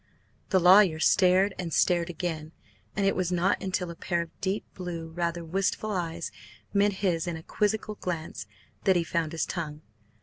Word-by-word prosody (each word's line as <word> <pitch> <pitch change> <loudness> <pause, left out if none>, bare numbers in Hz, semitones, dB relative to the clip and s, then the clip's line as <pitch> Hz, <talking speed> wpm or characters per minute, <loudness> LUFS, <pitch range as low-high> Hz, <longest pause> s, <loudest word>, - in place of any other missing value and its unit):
The 190 - +4
lawyer 180 -2 +6
stared 190 +3 +4
and 175 -3 -3
stared 175 +1 +2
again, 165 -2 -4 0.4
and 200 - +1
it 195 - +3
was 180 -1 0
not 180 +2 +1
until 185 -2 -2
a - - -9
pair 170 0 -1
of 170 - -18
deep 195 +2 -1
blue, 170 -3 -5
rather 170 0 -2
wistful 195 +5 -1
eyes 170 -3 -3 0.4
met 205 0 +4
his 170 -2 +1
in 170 -2 -2
a 160 - -10
quizzical 215 +3 -1
glance, 170 -5 -5 0.4
that 190 - +5
he 175 - +2
found 165 -1 -1
his 165 - -1
tongue. 155 -4 -5
175 Hz, 175 wpm, -28 LUFS, 165-190 Hz, 0.4 s, lawyer